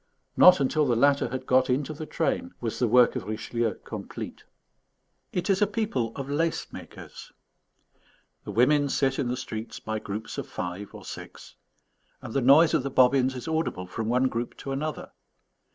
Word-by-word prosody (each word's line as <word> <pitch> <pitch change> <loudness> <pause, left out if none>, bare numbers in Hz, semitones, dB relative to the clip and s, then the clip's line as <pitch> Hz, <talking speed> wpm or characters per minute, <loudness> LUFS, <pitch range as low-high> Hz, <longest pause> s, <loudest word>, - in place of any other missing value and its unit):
Not 180 -2 +8
until 145 +2 +1
the 120 - +2
latter 140 +4 +3
had 130 0 -5
got 130 0 +3
into 140 +4 0
the 155 +1 -7
train 255 +10 -2
was 115 -2 -4
the 125 - +2
work 125 +2 +5
of - - -4
Richelieu 110 0 -2
complete. - - -7 0.9
It 180 -1 -2
is 195 -1 +2
a 210 - +5
people 200 - -1
of 135 -1 -5
lace 160 +3 -1
makers. - - -11 1.1
The - - -10
women 145 +4 +3
sit 135 0 +1
in 135 - 0
the 125 +1 -2
streets 110 -3 -6
by 110 0 -4
groups 105 +2 -6
of - - -5
five 90 +3 -6
or - - -11
six; - - -10 0.6
and 110 - -8
the 135 - +1
noise 145 +6 +6
of - - +3
the 140 - -3
bobbins 130 0 +3
is 125 - -7
audible 160 - -1
from 110 +4 -4
one 125 +2 +3
group 120 -1 -4
to 135 - -6
another. 150 +3 -4
130 Hz, 180 wpm, -27 LUFS, 120-150 Hz, 1.1 s, Not